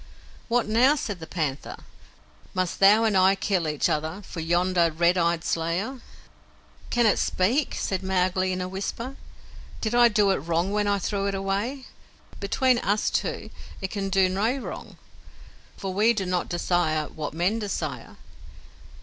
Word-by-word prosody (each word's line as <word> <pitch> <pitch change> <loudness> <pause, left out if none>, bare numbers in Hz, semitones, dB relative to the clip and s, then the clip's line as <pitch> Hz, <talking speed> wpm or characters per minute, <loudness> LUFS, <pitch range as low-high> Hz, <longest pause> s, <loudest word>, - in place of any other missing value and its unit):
"What 240 -1 +1
now?" 245 +7 +4
said 205 -10 -4
the 160 - -8
panther. 150 -6 -3 0.8
"Must 185 -1 -1
thou 205 +3 +6
and 220 -3 +2
I 190 +1 +5
kill 190 -4 0
each 150 -1 0
other 160 +6 -2
for 180 - -8
yonder 175 +1 +2
red 170 +3 +2
eyed 170 -1 +1
slayer?" 175 +12 -2 0.9
"Can 240 -1 +2
it 215 - +3
speak?" 240 +11 +1
said 190 -1 -2
Mowgli 185 0 +1
in 185 0 -2
a 180 - -2
whisper. 215 +7 -5 0.6
"Did 220 0 -2
I 240 0 +7
do 210 -3 +3
it 190 - +2
a - - -5
wrong 170 +5 -1
when 210 0 0
I 200 0 +2
threw 200 +1 -2
it 200 - -1
away? 200 +8 -2 0.5
Between 250 +5 +2
us 210 -3 0
two - - -2 0.3
it 190 -2 -4
can 195 -2 -3
do 190 -1 +3
no 210 +8 0
wrong, 270 - -8 0.8
for 190 -2 -4
we 215 +4 +4
do 200 -4 -2
not 180 -1 -1
desire 175 -3 0
what 155 -1 -6
men 185 +7 +1
desire. 205 -2 -4
195 Hz, 165 wpm, -25 LUFS, 175-215 Hz, 0.9 s, I